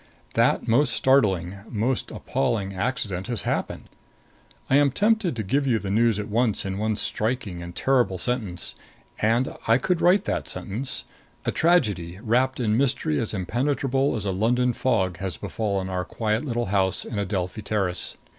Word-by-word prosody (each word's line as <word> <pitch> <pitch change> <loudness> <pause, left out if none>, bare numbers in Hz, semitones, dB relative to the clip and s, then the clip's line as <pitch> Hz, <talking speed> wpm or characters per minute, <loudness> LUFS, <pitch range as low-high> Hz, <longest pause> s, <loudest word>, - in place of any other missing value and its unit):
That - - +2
most 125 +2 +3
startling, 100 -10 +2
most 120 +4 -1
appalling 95 +6 -1
accident 100 -3 -2
has 120 -3 -2
happened. - - -2 0.8
I 135 - +4
am 145 -1 +5
tempted 205 - +1
to 110 - -2
give 135 +8 0
you 120 -3 +3
the 100 -2 -4
news 115 0 +3
at 105 - -4
once 110 -1 0
in 95 0 -3
one 110 0 0
striking 110 -5 -2
and 85 0 -8
terrible 125 -8 +2
sentence. 105 -3 -2 0.5
And 115 +4 +1
I 115 +1 +5
could 175 +6 0
write 185 +3 +4
that - - -2
sentence. 115 +7 -3 0.4
A - - +1
tragedy, 105 - +2
wrapped 125 +4 +1
in 110 -3 +1
mystery 140 +3 +1
as 115 - -1
impenetrable 135 +7 0
as 110 - -3
a 100 - 0
London 120 +6 +2
fog, 95 -9 0
has 95 -3 -4
befallen 100 -4 -2
our 90 -1 -2
quiet 110 +3 -1
little 120 -4 -1
house 95 -2 +2
in 105 - -4
Adelphi 95 0 -2
Terrace. 95 -4 0
110 Hz, 165 wpm, -25 LUFS, 95-130 Hz, 0.8 s, am